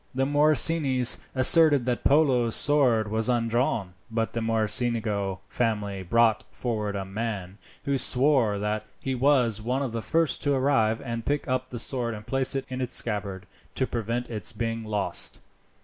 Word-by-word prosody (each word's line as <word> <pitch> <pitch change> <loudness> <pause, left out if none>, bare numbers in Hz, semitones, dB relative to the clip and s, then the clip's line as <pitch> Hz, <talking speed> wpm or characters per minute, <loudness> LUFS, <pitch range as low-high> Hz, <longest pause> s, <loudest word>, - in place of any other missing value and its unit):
The 135 0 +1
Morosinis 145 -2 +4 0.2
asserted 145 0 +5
that 125 -1 -2
Polo's 130 -6 +2
sword 130 -7 +3
was 110 +3 -1
undrawn, 115 -5 -1 0.2
but 115 0 -3
the 115 - -3
Mocenigo 110 -3 -1
family 105 -4 -2
brought 115 +4 +2
forward 105 -4 -4
a 95 -1 -4
man, 100 -2 -5 0.3
who 140 -1 0
swore 125 -5 +3
that 105 +1 -3 0.2
he 135 - -3
was 125 -5 +2
one 125 +5 -2
of 130 - -4
the 115 0 -4
first 165 +6 0
to 145 -1 +1
arrive, 115 -5 +1
and 115 -3 -5
pick 145 +3 -2
up 130 0 -2
the 125 - -7
sword 120 -1 -1
and 105 0 -11
place 135 +1 0
it 135 - -3
in 130 0 -6
its 125 - -3
scabbard 100 -4 -3 0.3
to 130 - 0
prevent 120 0 -4
its 110 -3 -4
being 115 -1 -4
lost. 105 -2 -3
115 Hz, 165 wpm, -25 LUFS, 110-130 Hz, 0.3 s, asserted